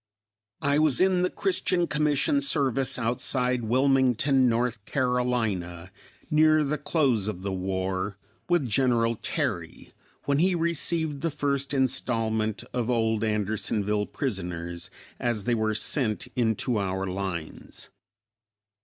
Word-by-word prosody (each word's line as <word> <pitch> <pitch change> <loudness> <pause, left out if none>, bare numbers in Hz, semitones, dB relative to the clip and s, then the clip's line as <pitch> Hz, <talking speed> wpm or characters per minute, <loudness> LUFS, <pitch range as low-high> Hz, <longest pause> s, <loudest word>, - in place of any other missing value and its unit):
I 145 +1 +3
was 155 -4 +3
in 185 -1 +3
the 180 - +2
Christian 180 -2 0
Commission 150 - +1
service 135 - 0
outside 125 +1 0
Wilmington, 130 +1 +3
North 120 -2 -1
Carolina, 115 -9 -1 0.4
near 155 0 +5
the 150 +1 -1
close 135 - +1
of 95 -4 -4
the 100 -1 -2
war, 95 +1 -2 0.3
with 175 -7 +2
General 115 0 +2
Terry, - - -3 0.3
when 140 0 +1
he 180 +2 +3
received 165 -3 0
the 165 - 0
first 140 -2 -2
installment 115 -5 0
of 120 -1 -1
old 115 -2 +1
Andersonville 105 -1 -1
prisoners 85 - -4 0.3
as 120 -4 -1
they 120 - +1
were 110 -1 0
sent 110 -1 0
into 115 -1 +1
our 95 -1 -2
lines. 90 -4 -5
125 Hz, 120 wpm, -26 LUFS, 105-140 Hz, 0.4 s, near